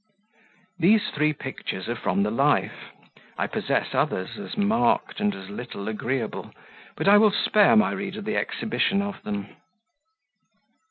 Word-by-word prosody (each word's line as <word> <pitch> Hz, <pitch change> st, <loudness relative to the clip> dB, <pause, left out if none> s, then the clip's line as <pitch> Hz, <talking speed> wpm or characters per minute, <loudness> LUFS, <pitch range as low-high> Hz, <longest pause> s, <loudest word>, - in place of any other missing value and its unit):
These 210 Hz, +5 st, +3 dB
three 150 Hz, +1 st, +2 dB
pictures 135 Hz, -9 st, -6 dB
are 120 Hz, -, -2 dB
from 100 Hz, -3 st, 0 dB
the 105 Hz, -, -1 dB
life. 140 Hz, +5 st, 0 dB, 0.5 s
I -, -, 0 dB
possess -, -, -1 dB
others, 95 Hz, -, -1 dB
as 210 Hz, +3 st, -7 dB
marked 225 Hz, +4 st, +1 dB
and 210 Hz, -1 st, 0 dB
as 95 Hz, +1 st, -10 dB
little 100 Hz, -2 st, -7 dB
agreeable, 115 Hz, +2 st, -3 dB, 0.4 s
but -, -, -3 dB
I 205 Hz, +1 st, +8 dB
will 215 Hz, 0 st, +6 dB
spare 205 Hz, +1 st, +4 dB
my 220 Hz, +1 st, +4 dB
reader 195 Hz, +2 st, -5 dB
the 215 Hz, +1 st, -2 dB
exhibition 200 Hz, -3 st, 0 dB
of 200 Hz, -1 st, -6 dB
them. 100 Hz, -1 st, -5 dB
190 Hz, 145 wpm, -25 LUFS, -, 0.5 s, I